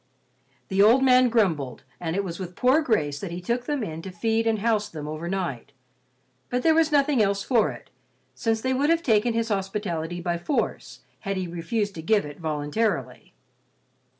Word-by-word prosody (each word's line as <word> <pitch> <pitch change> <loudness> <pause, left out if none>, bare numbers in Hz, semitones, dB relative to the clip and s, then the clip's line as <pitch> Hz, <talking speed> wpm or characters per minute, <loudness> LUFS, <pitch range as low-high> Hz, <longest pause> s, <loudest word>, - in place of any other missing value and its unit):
The 195 0 +2
old 235 +6 +6
man 255 -1 +5
grumbled, 170 - 0 0.2
and 165 -1 -3
it 200 - 0
was 170 -2 -6
with 180 -1 -6
poor 260 +5 +4
grace 150 - 0
that 195 - -5
he 170 +1 -5
took 235 +7 -2
them 290 -4 -1
in 160 -4 -5
to 190 - -7
feed 225 +5 0
and 225 -1 +2
house 210 -1 0
them 150 -5 -7
over 155 +3 -5
night. 140 -9 -3 0.8
But 250 0 -1
there 325 - +5
was 320 -1 +3
nothing 285 -3 +3
else 200 -1 +1
for 230 -5 +2
it, - - -10 0.4
since 225 -1 -1
they 260 +2 0
would 280 +4 +1
have 335 0 +2
taken 225 -2 +2
his 230 0 0
hospitality 190 -4 -2
by 170 0 -2
force 270 - -2 0.2
had 195 0 -3
he 185 -1 -2
refused 195 +5 -2
to 160 - -7
give 205 +2 +2
it 145 -1 -9
voluntarily. 150 - -2
200 Hz, 190 wpm, -25 LUFS, 170-235 Hz, 0.8 s, old